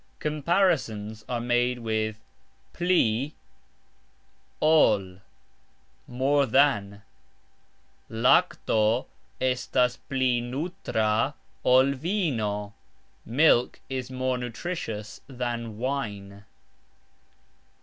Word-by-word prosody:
Comparisons 145 - 0
are 120 -1 -1
made 120 +1 +1
with 110 -2 -2 0.6
"pli...ol", 150 -6 +1 2.7
more 135 +3 +2
than: 105 -8 +2 1.1
"Lakto 115 0 +2 0.3
estas 125 -1 +1
pli 130 -3 +1
nutra 125 - -1 0.3
ol 130 +2 +5
vino", 125 - -2 0.5
Milk 125 0 +3
is 130 -1 -4
more 130 -1 -1
nutritious 115 -4 -5
than 120 -4 -4
wine. 105 -6 -4
125 Hz, 65 wpm, -26 LUFS, 110-140 Hz, 2.7 s, ol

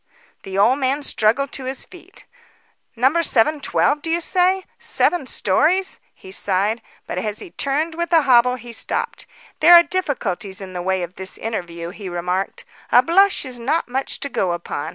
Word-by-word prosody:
The 195 0 -6
old 240 +7 +4
man 275 +2 0
struggled 260 +4 +1
to 265 - -5
his 260 0 -4
feet. 365 +1 -16 0.7
"No. 265 +8 +2
712, 295 +1 +2
do 325 - -4
you 335 +1 +2
say? 370 +2 +1
Seven 345 -7 +1
stories," 330 - +1 0.2
he 190 - -13
sighed. 200 +4 0 0.2
But - - -4
as 210 -1 -3
he 345 - -8
turned 300 +4 -1
with 340 +1 -3
a 325 -2 +5
hobble, 250 -1 +4
he 240 -1 -10
stopped. - - -3 0.3
"There 345 +3 +8
are 340 - +9
difficulties 240 - -3
in 190 -2 -9
the 180 - -4
way 190 0 -1
of 175 +1 -8
this 190 0 -5
interview," 170 -6 -5
he 200 -1 -8
remarked. 180 +2 -3 0.3
"A 245 - +6
blush 385 +3 +3
is 250 -2 -7
not 290 +8 -1
much 265 +2 -3
to 280 - -3
go 185 -9 0
upon. 170 -4 -5
255 Hz, 175 wpm, -20 LUFS, 195-320 Hz, 0.7 s, are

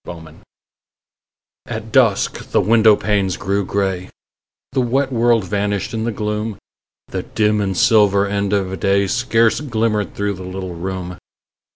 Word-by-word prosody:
FORGIVENESS 80 -2 -11 1.3
At 110 -1 -6
dusk 120 -7 +2
the - - +2
window 110 -1 +5
panes 100 -4 0
grew 100 +1 -1
grey; 95 -2 -2 0.6
The 130 -1 +1
wet 135 +3 0
world 115 -2 +3
vanished 100 +2 -2
in 110 0 -2
the 120 - -1
gloom; 105 0 -3 0.5
The - - -3
dim 105 -1 0
and 95 -2 -2
silver 100 -3 +4
end 100 -1 -1
of 95 -2 -1
day 100 +2 +2
Scarce 115 +1 +2
glimmered 110 -6 -1
through 100 0 -1
the 95 -1 -9
little 95 0 -6
room. 90 +1 -5
105 Hz, 145 wpm, -19 LUFS, 95-110 Hz, 1.3 s, window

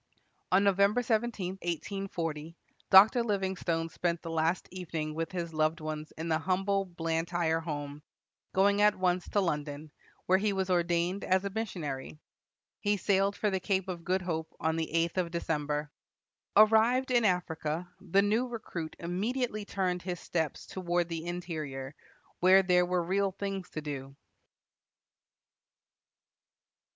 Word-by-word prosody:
On 190 +2 +5
Nov. 200 -2 +3
17, 215 -2 +1
1840, 170 -3 -4 0.3
Dr. 215 +5 +8
Livingstone 190 -6 -1
spent 170 0 -2
the 165 - -5
last 165 +2 0
evening 165 -4 -4
with 165 +1 -3
his 170 -3 -4
loved 155 +1 +1
ones 155 0 -5
in 160 +1 -4
the 160 -1 +1
humble 195 +3 0
Blantyre 165 -1 -1
home, 145 -3 -5 0.5
going 200 +2 +3
at 210 0 +5
once 180 -1 0
to 205 - +2
London, 150 -3 -3 0.3
where 185 +1 +4
he 205 0 +1
was 190 -1 -1
ordained 175 +2 +1
as 190 +1 +2
a 200 - -2
missionary. 165 -11 -4 0.6
He 205 0 +1
sailed 195 +1 +2
for 210 - 0
the 190 - 0
Cape 190 0 0
of 175 -3 -5
Good 185 +2 0
Hope 160 -2 -3
on 160 0 0
the 165 -1 -2
eighth 165 +2 +1
of 175 -2 0
December. 150 -3 -2 0.7
Arrived 225 +5 +5
in 240 -2 +4
Africa, 170 -3 0
the 195 +1 +2
new 220 +5 +1
recruit 185 -9 -6
immediately 215 +5 -2
turned 180 -3 -1
his 180 -1 -4
steps 160 -4 -2
toward 175 -2 -1
the 165 0 -4
interior, 155 -6 -5 0.5
where 190 +2 +6
there 180 -1 +3
were 180 -1 +1
real 195 +2 0
things 195 -1 -4
to 155 - -5
do. 135 -2 -6
180 Hz, 140 wpm, -30 LUFS, 160-195 Hz, 0.7 s, Dr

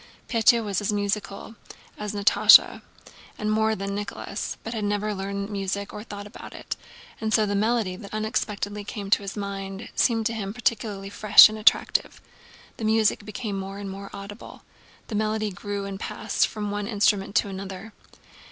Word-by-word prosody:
Pétya 230 0 +4
was 200 -1 -1
as 205 - 0
musical 205 +1 -3 0.4
as 210 -1 -5
Natásha 205 +1 +6 0.6
and 215 0 -1
more 220 0 +2
so - - -2
than 195 0 -4
Nicholas, 205 +1 -5
but 225 - -5
had 220 -2 -3
never 205 +1 -1
learned 200 +1 -4
music 200 0 -3
or 210 - -7
thought 205 -2 -8
about 210 - -11
it, - - -5 0.4
and 220 -1 -2
so 220 -1 +4
the 205 - -2
melody 215 -2 +1
that 200 +1 -11
unexpectedly 210 -1 -2
came 200 -1 -6
to - - +5
his 200 +1 -6
mind 195 0 -5
seemed 225 -3 +2
to 230 - +1
him 205 -2 -4
particularly 210 -4 -2
fresh 210 +1 +8
and 215 - -6
attractive. 215 - +2 0.6
The 230 - -7
music 220 -1 +2
became 210 -1 -4
more 195 +1 -6
and 200 -1 -6
more 195 +1 -8
audible. 200 +2 -10 0.4
The - - -9
melody 215 0 0
grew 200 +2 -5
and 195 -1 -6
passed 220 -1 0
from 210 -2 -4
one 205 0 -3
instrument 205 -2 +1
to 205 - +2
another. 195 +2 -7
205 Hz, 175 wpm, -25 LUFS, 200-215 Hz, 0.6 s, fresh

